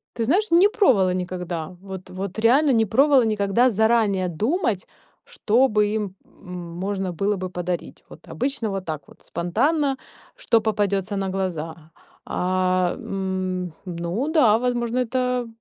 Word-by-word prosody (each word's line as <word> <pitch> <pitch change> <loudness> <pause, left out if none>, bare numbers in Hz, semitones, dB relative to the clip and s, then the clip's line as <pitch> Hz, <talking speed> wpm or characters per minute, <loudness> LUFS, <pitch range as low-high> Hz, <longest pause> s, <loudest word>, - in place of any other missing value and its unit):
Ты 230 - -1
знаешь, 375 - +1
не 350 +4 +7
пробовала 245 - +3
никогда. 180 -2 -4
Вот 190 -1 -9
вот 190 +1 -6
реально 260 +7 +4
не 225 -3 +3
пробовала 275 +4 +4
никогда 215 +3 +2
заранее 220 -3 +2
думать, 220 - -1 0.4
что 240 +5 +2
бы 210 -3 +2
им, 205 -3 -3
м, 180 -2 -12 0.2
можно 190 0 -2
было 200 +5 0
бы 185 -1 -4
подарить. 180 -1 -5
Вот - - -14
обычно 255 -4 -2
вот 195 -1 -4
так 155 -3 -5
вот - - -19
спонтанно, 275 - 0 0.4
что 480 - +2
попадётся 205 -2 0
на 195 -1 -2
глаза. 165 -4 -4 0.3
А, 185 0 +1
м, 185 -2 -3
ну 180 - -3
да, 245 -10 +5
возможно 240 0 -1
это, 250 0 0
200 Hz, 140 wpm, -23 LUFS, 185-245 Hz, 0.4 s, не